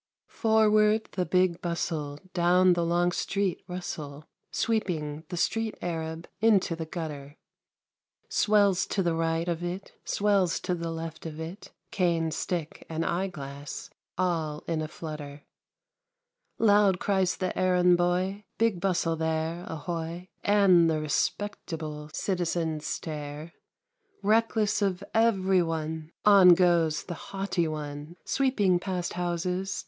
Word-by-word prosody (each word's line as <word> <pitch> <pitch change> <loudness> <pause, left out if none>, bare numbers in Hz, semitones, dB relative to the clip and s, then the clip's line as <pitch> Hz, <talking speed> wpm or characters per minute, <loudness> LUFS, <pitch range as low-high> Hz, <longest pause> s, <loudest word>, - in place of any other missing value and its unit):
Forward 215 -1 +3
the 180 -2 -2
Big 180 -2 +2
Bustle! 155 -4 -3
Down 180 +1 +4
the 170 -1 0
long 175 +1 +2
street 195 +1 -1
rustle. 155 -5 -6 0.2
Sweeping 160 -9 -1
the 175 - -4
street 225 +5 0
Arab 165 -1 -4
Into 200 -5 +3
the 165 -1 -5
gutter; 150 -3 -6 0.9
Swells 200 -3 +3
to 195 - 0
the 170 -1 +1
right 165 +1 0
of 170 0 -2
it, 180 +3 -5
Swells 200 -4 +2
to 180 - -1
the 170 -1 -3
left 165 0 -6
of 155 -1 -8
it, 170 +6 -7 0.2
Cane, 170 -4 +1
stick, 165 -1 -3
and 165 0 -2
eyeglass. 145 -6 -4 0.3
All 165 -5 -1
in 165 -2 -1
a 155 - -3
flutter 150 -3 -8 1.1
1 225 - +2
Loud 205 -3 +5
cries 190 -2 +1
the 185 -1 -2
errand 180 -1 +4
boy, 180 +3 0
" - - -50
Big 225 -5 +2
Bustle 175 -3 +1
there, 160 +1 -2
ahoy? 165 +3 -5
" - - -42 0.2
And 175 -4 +6
the 155 -1 +1
respectable 155 0 -3
Citizens 165 -4 -1
stare 150 +1 -5 0.4
— 415 - -41
Reckless 215 0 +2
of 195 -1 0
every 195 -5 +3
one. 160 -1 -3 0.2
On 195 -4 +8
goes 170 -3 +3
the 175 - -6
" - - -12
haughty 195 -3 -1
one,'' 150 +1 -6
Sweeping 210 -10 +2
past 180 -2 -3
houses. 180 +2 -2
175 Hz, 135 wpm, -28 LUFS, 160-195 Hz, 1.1 s, On